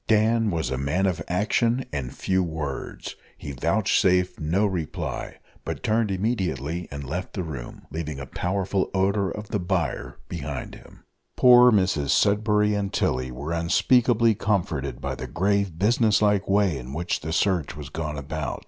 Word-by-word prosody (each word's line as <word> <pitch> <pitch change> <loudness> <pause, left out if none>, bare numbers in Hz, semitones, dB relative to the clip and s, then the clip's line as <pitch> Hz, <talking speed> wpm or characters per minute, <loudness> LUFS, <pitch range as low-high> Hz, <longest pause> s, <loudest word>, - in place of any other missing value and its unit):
Dan 110 +1 +3
was 80 -8 -2
a 65 - -2
man 70 +8 0
of 90 -4 0
action 115 +7 +1
and 70 -3 -3
few 95 0 0
words: 80 -5 -5 0.2
he 70 - -7
vouchsafed 90 - +2
no 85 +7 +1
reply, 90 -7 -3 0.3
but - - -5
turned 110 0 +1
immediately 90 - -2
and 70 +1 -6
left 85 +7 -5
the 95 - -3
room, 70 -7 -7
leaving 75 -3 -4
a 65 - -6
powerful 95 +6 -1
odour 100 +1 +1
of 105 0 -7
the 105 - -1
byre 90 -2 -2
behind 75 -5 -5
him. - - -15 0.3
Poor 125 0 +8
Mrs 95 - +1
Sudberry 105 0 +3
and 100 -1 -1
Tilly 65 0 0
were 70 +6 -5
unspeakably 115 +7 +3
comforted 85 -10 -1
by - - -2
the - - -6
grave 100 -1 0
business 110 +2 +3
like 105 -2 +2
way, 100 -7 +2
in 65 +1 -8
which 85 +3 -2
the 80 - -5
search 85 -3 0
was 75 -3 -7
gone 75 +1 -4
about. 75 +2 -4
90 Hz, 160 wpm, -25 LUFS, 75-105 Hz, 0.3 s, Poor